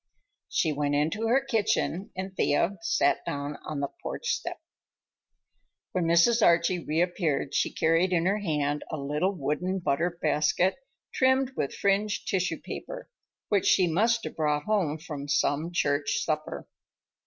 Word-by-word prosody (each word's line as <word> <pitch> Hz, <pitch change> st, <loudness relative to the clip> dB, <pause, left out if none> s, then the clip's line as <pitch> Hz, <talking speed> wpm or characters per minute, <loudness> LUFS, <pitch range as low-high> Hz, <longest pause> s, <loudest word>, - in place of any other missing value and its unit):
She 160 Hz, -3 st, +1 dB
went 145 Hz, 0 st, 0 dB
into 165 Hz, +10 st, 0 dB
her 265 Hz, +4 st, +2 dB
kitchen 220 Hz, -5 st, 0 dB
and 190 Hz, +1 st, -5 dB
Thea 170 Hz, +5 st, +1 dB
sat 170 Hz, -, +1 dB
down 145 Hz, +1 st, -4 dB
on 150 Hz, -2 st, -4 dB
the 140 Hz, -, -1 dB
porch 485 Hz, -, -4 dB
step. -, -, -2 dB, 1.3 s
When 180 Hz, -2 st, 0 dB
Mrs. 175 Hz, +8 st, +4 dB
Archie 170 Hz, 0 st, +3 dB
reappeared 165 Hz, -2 st, 0 dB
she -, -, +1 dB
carried 165 Hz, +3 st, +2 dB
in 170 Hz, -2 st, +2 dB
her 200 Hz, +3 st, +2 dB
hand 150 Hz, -6 st, -1 dB
a 155 Hz, -, -3 dB
little 150 Hz, +6 st, 0 dB
wooden 175 Hz, +5 st, -1 dB
butter 170 Hz, 0 st, -1 dB
basket 155 Hz, +5 st, +2 dB, 0.4 s
trimmed 260 Hz, 0 st, +2 dB
with 140 Hz, -, -2 dB
fringed 205 Hz, +1 st, 0 dB
tissue 185 Hz, -1 st, 0 dB
paper, -, -, -8 dB, 0.4 s
which 200 Hz, -3 st, +2 dB
she 185 Hz, -, +5 dB
must 225 Hz, +7 st, +2 dB
have -, -, -6 dB
brought 150 Hz, -2 st, 0 dB
home 180 Hz, -7 st, 0 dB
from 150 Hz, -3 st, -7 dB
some 150 Hz, +3 st, +1 dB
church 145 Hz, -3 st, 0 dB
supper. 155 Hz, -1 st, -3 dB
170 Hz, 145 wpm, -27 LUFS, 150-195 Hz, 1.3 s, she